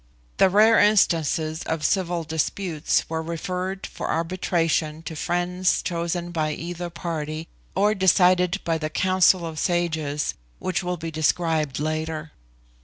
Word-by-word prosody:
The 190 Hz, -, +5 dB
rare 215 Hz, +4 st, +5 dB
instances 165 Hz, -6 st, +2 dB
of 160 Hz, -1 st, -2 dB
civil 175 Hz, -3 st, 0 dB
disputes 160 Hz, +1 st, -1 dB
were 160 Hz, 0 st, -2 dB
referred 180 Hz, +3 st, -4 dB
for -, -, -6 dB
arbitration 165 Hz, -2 st, 0 dB
to 160 Hz, -, -6 dB
friends 175 Hz, +3 st, 0 dB
chosen 170 Hz, 0 st, -2 dB
by 155 Hz, -2 st, -1 dB
either 175 Hz, +2 st, -5 dB
party, 160 Hz, -2 st, -4 dB, 0.3 s
or 205 Hz, +2 st, +3 dB
decided 185 Hz, -1 st, +3 dB
by 165 Hz, -1 st, 0 dB
the 155 Hz, -1 st, -2 dB
Council 185 Hz, +1 st, +3 dB
of 160 Hz, -2 st, -5 dB
Sages, 160 Hz, -, 0 dB, 0.2 s
which 185 Hz, 0 st, -2 dB
will 180 Hz, 0 st, -2 dB
be 165 Hz, 0 st, -5 dB
described 155 Hz, -2 st, 0 dB
later. 155 Hz, +1 st, -3 dB
170 Hz, 130 wpm, -24 LUFS, 160-180 Hz, 0.3 s, The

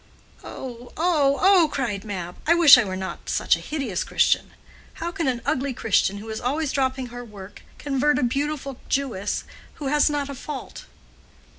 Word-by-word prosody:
"Oh, 245 Hz, -1 st, -8 dB
oh, 300 Hz, -5 st, +2 dB
oh!" 375 Hz, -5 st, +5 dB
cried 235 Hz, -8 st, -2 dB
Mab. 180 Hz, -4 st, -5 dB
"I 340 Hz, -, +5 dB
wish 330 Hz, -5 st, +10 dB
I 240 Hz, -, +3 dB
were 190 Hz, -2 st, -4 dB
not 190 Hz, 0 st, -6 dB
such -, -, +2 dB
a -, -, -7 dB
hideous 270 Hz, -, -3 dB
Christian. -, -, +2 dB, 0.5 s
How 340 Hz, +1 st, -4 dB
can 335 Hz, -3 st, -2 dB
an 245 Hz, -3 st, -1 dB
ugly 265 Hz, -1 st, -1 dB
Christian, 200 Hz, -2 st, +1 dB
who 215 Hz, +2 st, -9 dB
is 220 Hz, -, -5 dB
always 285 Hz, +3 st, -1 dB
dropping 260 Hz, -2 st, -1 dB
her 245 Hz, +1 st, -8 dB
work, 205 Hz, -3 st, -12 dB, 0.2 s
convert 285 Hz, 0 st, +1 dB
a 255 Hz, -, 0 dB
beautiful 275 Hz, +1 st, -2 dB
Jewess, 230 Hz, -8 st, -1 dB, 0.3 s
who 280 Hz, -3 st, -4 dB
has 295 Hz, +1 st, +3 dB
not 290 Hz, -1 st, -2 dB
a 280 Hz, -, -6 dB
fault?" 275 Hz, +1 st, -8 dB
265 Hz, 175 wpm, -24 LUFS, 225-295 Hz, 0.5 s, wish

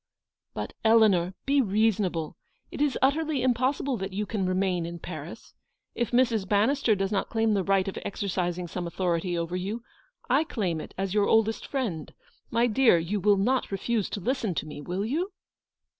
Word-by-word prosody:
"But, -, -, -4 dB
Eleanor, 210 Hz, -5 st, +4 dB
be 280 Hz, 0 st, +3 dB
reasonable. 200 Hz, -, 0 dB, 0.4 s
It -, -, -5 dB
is 290 Hz, -3 st, +2 dB
utterly 295 Hz, 0 st, +2 dB
impossible 260 Hz, +1 st, +1 dB
that 195 Hz, -1 st, -5 dB
you 210 Hz, +2 st, -1 dB
can 200 Hz, -3 st, -2 dB
remain 185 Hz, -1 st, 0 dB
in 170 Hz, +1 st, -5 dB
Paris. 165 Hz, +3 st, -8 dB, 0.4 s
If 240 Hz, -2 st, -1 dB
Mrs. 230 Hz, -6 st, +2 dB
Bannister 225 Hz, +3 st, +3 dB
does 195 Hz, 0 st, -1 dB
not 200 Hz, -, -1 dB
claim 225 Hz, -1 st, +1 dB
the 195 Hz, -2 st, +1 dB
right 195 Hz, 0 st, +2 dB
of 195 Hz, -, -4 dB
exercising 180 Hz, -3 st, -2 dB
some 175 Hz, +1 st, -4 dB
authority 175 Hz, 0 st, -1 dB
over 170 Hz, +1 st, -2 dB
you, 200 Hz, +6 st, -3 dB, 0.4 s
I 270 Hz, +5 st, +3 dB
claim 185 Hz, -, -2 dB
it -, -, -11 dB
as 195 Hz, 0 st, -2 dB
your 205 Hz, -1 st, +3 dB
oldest 220 Hz, 0 st, +2 dB
friend. 225 Hz, -, -3 dB, 0.4 s
My 235 Hz, +1 st, +2 dB
dear, 240 Hz, -4 st, +4 dB
you 175 Hz, +5 st, -1 dB
will 205 Hz, +1 st, +4 dB
not 245 Hz, +6 st, +1 dB
refuse 210 Hz, +1 st, -1 dB
to -, -, -4 dB
listen 230 Hz, -3 st, -1 dB
to -, -, -2 dB
me, 150 Hz, -1 st, -8 dB
will 180 Hz, +6 st, -3 dB
you 340 Hz, -, -2 dB
205 Hz, 175 wpm, -27 LUFS, 180-240 Hz, 0.4 s, Eleanor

